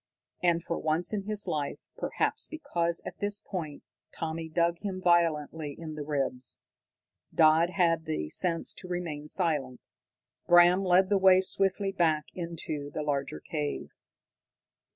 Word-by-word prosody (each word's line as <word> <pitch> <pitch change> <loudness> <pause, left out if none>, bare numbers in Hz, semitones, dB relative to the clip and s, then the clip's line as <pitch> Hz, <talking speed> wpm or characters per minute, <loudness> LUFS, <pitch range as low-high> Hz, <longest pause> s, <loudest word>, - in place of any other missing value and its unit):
And 170 -1 +2
for 170 - -3
once 160 +5 0
in 200 -2 -2
his 210 -1 0
life, 145 -2 -2 0.2
perhaps - - -1
because 175 - -2
at - - -8
this 205 0 -1
point 165 -8 -6 0.3
Tommy 160 0 -4
dug 170 +1 +1
him 195 -3 -4
violently 160 -4 +1
in 160 -2 -7
the 150 - -6
ribs, 135 -4 0 0.7
Dodd 160 +2 +5
had 165 -3 +1
the 155 - -2
sense 170 - +2
to 185 - -10
remain 165 -5 -4
silent. 150 -8 0 0.7
Bram 175 +2 +6
led 185 +1 +4
the 200 -1 +3
way 190 -1 +6
swiftly 195 +1 +1
back 160 -5 +1
into 165 -4 -5
the 150 - -3
larger 140 -2 -2
cave. 150 -2 -4
170 Hz, 140 wpm, -29 LUFS, 155-185 Hz, 0.7 s, Bram